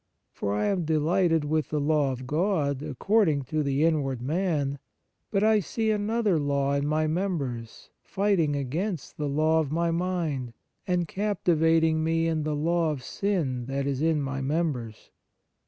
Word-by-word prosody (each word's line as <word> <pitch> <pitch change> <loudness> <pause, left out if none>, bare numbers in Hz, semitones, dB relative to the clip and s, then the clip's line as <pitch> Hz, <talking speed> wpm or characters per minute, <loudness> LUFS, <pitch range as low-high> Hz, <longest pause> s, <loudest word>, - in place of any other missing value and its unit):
For 100 0 -2
I 105 - 0
am 195 -4 +1
delighted 160 +1 +2
with 155 +1 0
the 150 - -1
law 145 -1 +2
of 130 0 -6
God, 150 -2 0
according 155 - +1
to 155 +4 -2
the 140 0 +1
inward 145 -6 +1
man: 145 -1 -1 0.5
but 200 -1 +1
I 215 0 +5
see 220 +4 -1
another 210 -3 +1
law 140 -1 0
in 140 0 0
my 155 +1 +1
members, 155 - -3
fighting 190 -7 +1
against 155 +6 -3
the 150 -1 -2
law 155 +3 +2
of 150 -3 -1
my 170 +1 +1
mind, 165 -8 -2 0.3
and 180 -2 +1
captivating 165 -5 +2
me 165 0 +1
in 160 -1 0
the 150 0 -1
law 165 +2 +1
of 145 -4 -4
sin, 145 -13 -2
that 135 0 -2
is 140 -1 -1
in 160 -2 +2
my 135 0 -3
members. 135 -6 -2
155 Hz, 160 wpm, -27 LUFS, 140-175 Hz, 0.5 s, I